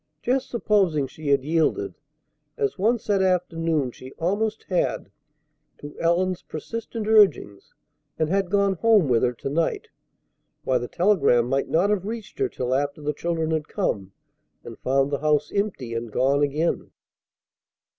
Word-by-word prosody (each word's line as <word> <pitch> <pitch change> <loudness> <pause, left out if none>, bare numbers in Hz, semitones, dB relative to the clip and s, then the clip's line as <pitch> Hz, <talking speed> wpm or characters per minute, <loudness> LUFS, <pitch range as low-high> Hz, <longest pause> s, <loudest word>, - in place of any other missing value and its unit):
Just 260 +2 0
supposing 195 - +1
she 150 +3 -9
had 140 -2 +3
yielded 165 - 0 0.6
as 420 - -1
once 230 +3 +1
that 200 -2 +2
afternoon 165 -6 0
she 130 +2 -12
almost 210 +6 -1
had 125 - -1 0.7
to 145 0 -10
Ellen's 175 +2 +1
persistent 225 +6 -6
urgings, 195 - +3 0.4
and 155 - +1
had 195 +2 0
gone 200 0 +2
home 215 -3 +4
with 120 -3 +3
her 125 -1 +1
to 120 - -7
night! 165 +3 -1 0.7
Why, 130 -1 +1
the 120 - -5
telegram 170 - +3
might 135 +2 0
not 180 +6 +2
have 200 -2 -1
reached 220 -2 -7
her 400 -1 +1
till 125 - -2
after 140 +2 -1
the 150 0 -2
children 165 0 -2
had 155 -1 -1
come, 100 - -2 0.5
and - - -10
found 135 +2 +1
the 140 - -1
house 150 -1 +1
empty, 200 - -2
and 115 -1 -4
gone 140 +5 +2
again! 150 +4 0
165 Hz, 155 wpm, -24 LUFS, 140-200 Hz, 0.7 s, home